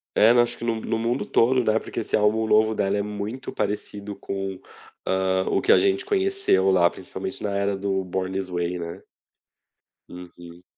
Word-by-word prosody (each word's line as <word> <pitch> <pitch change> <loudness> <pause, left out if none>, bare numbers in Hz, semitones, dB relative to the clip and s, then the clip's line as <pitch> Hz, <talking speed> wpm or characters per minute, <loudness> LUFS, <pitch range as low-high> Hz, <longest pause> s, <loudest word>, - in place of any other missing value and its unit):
É, 110 +2 +6
não 120 0 +5
acho 120 0 -3
que - - -8
no 115 -1 -1
no 110 0 -2
mundo 120 +3 -1
todo, 125 +2 +3
né. 110 0 +2
Porque - - -6
esse - - -1
álbum 110 +1 +2
novo 110 0 +3
dela 100 0 0
é - - 0
muito 105 +5 -5
parecido 105 0 -4
com, 95 -1 -5 0.5
hã, 95 0 +1
o - - +2
que - - +3
a - - +7
gente 385 -1 +1
conheceu 390 - +2
lá, 90 -2 +4
principalmente 95 +1 -6
na 100 -1 -2
era 100 0 0
do 95 -1 -1
Born 95 +1 -3
This 95 -1 -3
Way, 90 0 -2
né. 85 0 -7 1.1
Uhum. 85 -1 -12
100 Hz, 190 wpm, -24 LUFS, 95-115 Hz, 1.1 s, a